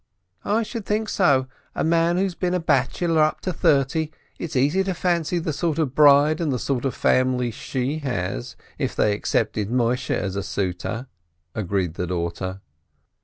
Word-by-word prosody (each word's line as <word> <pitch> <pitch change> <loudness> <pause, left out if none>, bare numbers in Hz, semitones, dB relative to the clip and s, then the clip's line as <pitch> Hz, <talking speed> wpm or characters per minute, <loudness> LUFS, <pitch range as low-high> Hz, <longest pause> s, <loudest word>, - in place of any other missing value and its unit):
"I 220 +3 +1
should 225 0 -5
think 215 +1 0
so, 140 -9 +3 0.3
a - - 0
man 165 +1 +2
who's 190 -1 0
been 180 +1 -1
a - - +1
bachelor 160 +2 +1
up 155 0 +2
to 185 - -2
thirty! 155 -1 +2 0.3
It's 165 - -5
easy 145 +9 +3
to 190 -2 -1
fancy 175 -1 0
the 165 -2 -2
sort 155 +1 -1
of 150 -6 0
bride, 150 +2 +5
and 155 -4 0
the 130 - 0
sort 130 +1 -2
of 135 - -1
family 125 -1 +2
she 130 +6 -3
has, 90 - -3 0.2
if - - -2
they 105 - +3
accepted 105 0 -1
Moisheh 125 0 +1
as 95 -2 -3
a 100 - -1
suitor," 100 +5 -3 0.5
agreed 95 -4 -1
the 90 +1 -3
daughter. 90 +2 -3
140 Hz, 170 wpm, -23 LUFS, 115-170 Hz, 0.5 s, bride